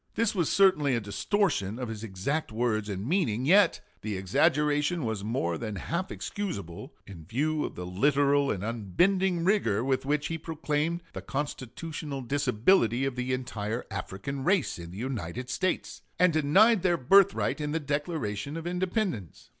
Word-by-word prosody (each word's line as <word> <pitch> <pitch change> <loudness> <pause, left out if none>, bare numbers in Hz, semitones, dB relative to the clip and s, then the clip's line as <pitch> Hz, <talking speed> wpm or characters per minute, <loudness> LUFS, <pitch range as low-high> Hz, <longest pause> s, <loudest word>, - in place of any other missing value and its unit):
This 230 -1 +1
was 175 -7 0
certainly 185 -9 +4
a - - +1
distortion 105 - 0
of 125 -1 -4
his 110 -1 -6
exact 115 +9 -2
words 110 -2 -1
and 100 0 -4
meaning; 130 - +1
yet 190 +3 +5 0.2
the 105 -3 -3
exaggeration 150 - +1
was 110 -3 -3
more 100 -7 -1
than 110 -2 -4
half 170 - -3
excusable, 100 - -5
in 90 -5 -11
view 150 - -1
of - - -5
the 90 - -6
literal 140 +8 +2
and 100 -2 -2
unbending 170 - +1
rigor 120 - +2
with 130 0 0
which 145 +1 0
he 165 0 -3
proclaimed 160 +1 -2
the - - -6
constitutional 145 +1 -5
disability 125 - +2
of 135 -2 -2
the 125 0 -2
entire 120 -3 -3
African 100 +8 -5
race 180 - +1
in 85 -1 -8
the 90 - -10
United 125 0 -4
States, 185 +6 -2 0.2
and 180 -2 +4
denied 190 +9 +5
their 175 -2 +2
birthright 175 +2 +4
in 150 0 -2
the 160 - 0
Declaration 145 - -3
of 165 - -6
Independence. 180 - -2
140 Hz, 160 wpm, -28 LUFS, 110-165 Hz, 0.2 s, yet